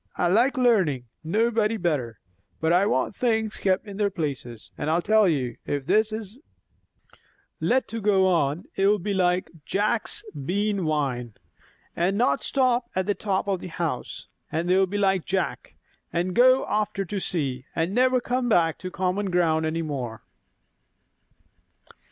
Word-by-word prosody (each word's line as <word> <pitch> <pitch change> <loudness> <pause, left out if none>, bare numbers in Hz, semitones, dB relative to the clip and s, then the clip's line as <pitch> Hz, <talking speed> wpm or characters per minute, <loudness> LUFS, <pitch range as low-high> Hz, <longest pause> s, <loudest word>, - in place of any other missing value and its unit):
I 175 - +2
like 245 +9 +3
learning, 190 - +2 0.2
nobody 220 +5 +1
better; 145 - -2 0.4
but 160 +1 +2
I 185 +3 +4
want 130 +6 0
things 220 -3 0
kept 190 +1 0
in 200 -2 -8
their 205 -1 +2
places. 140 - -5
And 150 - -3
I 165 +2 +2
tell 215 +1 +4
you, 130 -7 -1
if 145 -2 -2
this 215 +7 +2
is 215 +2 -6 1.2
let 260 +2 +1
to 225 0 -5
go 195 -2 +3
on, 165 -3 +1
it'll 200 +2 +3
be 200 +2 -3
like 180 -1 +1
Jack's 210 +6 0
bean 195 +7 -1
vine, 125 -7 -2 0.6
and 185 +4 +1
not 250 +4 +2
stop 250 -3 +1
at 185 0 0
the 205 - +1
top 200 -1 -2
of 195 -2 0
the 185 - -7
house; 165 -6 -4 0.2
and 165 +2 -1
they'll 190 +1 +3
be 205 +3 -3
like 195 -3 +2
Jack, 190 +1 -3 0.4
and 175 +2 -1
go 255 +5 +5
after 210 -2 -1
to 200 +3 -3
see, 135 -8 -3
and 165 +3 0
never 255 +2 +3
come 245 0 -1
back 165 -6 +2
to 185 - -5
common 190 +2 -1
ground 160 -3 +2
any 165 +1 -2
more." 125 -7 -5
190 Hz, 155 wpm, -25 LUFS, 160-215 Hz, 1.2 s, go